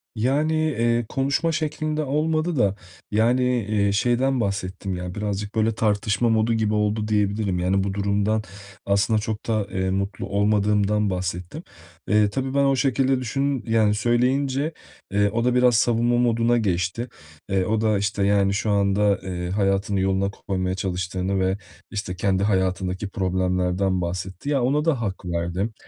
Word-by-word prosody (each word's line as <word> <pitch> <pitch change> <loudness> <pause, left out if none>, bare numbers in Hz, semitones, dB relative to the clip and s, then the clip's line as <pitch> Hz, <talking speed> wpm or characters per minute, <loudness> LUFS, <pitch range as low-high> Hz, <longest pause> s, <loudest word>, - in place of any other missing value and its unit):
Yani, 140 +8 +1 0.2
eee, 120 -1 +1
konuşma 140 +5 0
şeklinde 155 -1 -2
olmadı 155 +4 0
da, 100 -4 +2 0.4
yani, 120 +4 +3 0.2
eee, 100 -1 +1
şeyden 125 +5 +1
bahsettim. 95 -1 -3
Ya, 90 0 -6
birazcık 105 0 -3
böyle 110 0 +1
tartışma 105 +1 +1
modu 110 +1 +2
gibi 110 -1 0
oldu 105 0 0
diyebilirim. 100 -3 0
Yani, 95 +2 +1
bu 100 -1 -2
durumdan 100 +2 0 0.4
aslında 100 +2 +2
çok 110 -1 -4
da, 110 -3 0
eee, 95 0 -1
mutlu 100 +1 -2
olmadığımdan 105 0 +1
bahsettim. 90 - -4 0.4
Eee, 105 -1 +3
tabii 130 +3 -3
ben 140 0 +3
o 135 0 +3
şekilde 135 -1 +1
düşün 135 +2 -1
yani, 110 -2 +3
söyleyince, 130 +6 +1 0.4
eee, 100 0 +2
o 115 +2 -1
da 125 0 +2
biraz 125 -1 +4
savunma 120 +1 +2
moduna 120 0 +2
geçti. 100 +3 -1 0.4
Eee, 95 -1 +1
o 110 0 0
da, 110 -2 +2
işte, 100 0 -1
yani, 100 -1 +3
şu 105 +2 -1
anda, 100 0 +2
eee, 90 -2 -4
hayatını 100 0 0
yoluna 95 +1 +1
koymaya 95 -2 -3
çalıştığını 95 +1 -2
ve, 95 +1 +1 0.3
işte, 100 -3 -4
kendi 95 +1 0
hayatındaki 95 -1 0
problemlerden 90 0 0
bahsetti. 90 +8 -4
Ya, 140 -3 +2
ona 145 +5 +1
da 140 -8 +1
hak 100 -3 -4
verdim. 90 +5 -2
105 Hz, 155 wpm, -23 LUFS, 95-120 Hz, 0.4 s, biraz